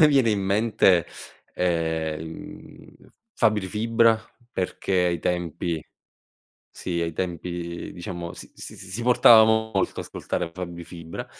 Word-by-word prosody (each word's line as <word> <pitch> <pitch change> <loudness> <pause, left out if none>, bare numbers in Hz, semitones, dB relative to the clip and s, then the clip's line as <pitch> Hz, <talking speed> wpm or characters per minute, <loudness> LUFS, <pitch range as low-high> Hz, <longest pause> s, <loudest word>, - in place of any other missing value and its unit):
me - - +7
viene 135 -6 +4
in 100 -2 +1
mente, 100 -3 +3 0.5
ehm, 80 -3 0
mhmm, 80 0 -11 0.2
Fabri 105 -3 +2
Fibra 115 +2 +3 0.3
perché 95 +1 -3
ai 85 -1 0
tempi 85 -1 -2 0.9
sì, 85 -2 -3
ai 85 -1 -1
tempi 85 0 -4
diciamo 85 -1 -6
s - - -11
s - - -9
s 95 - -11
si 115 +5 -4
portava 120 -2 +8
molto 110 0 +1
ascoltare 85 - -4
Fabri 85 -1 -6
Fibra, 85 -2 -8
90 Hz, 125 wpm, -25 LUFS, 85-110 Hz, 0.9 s, portava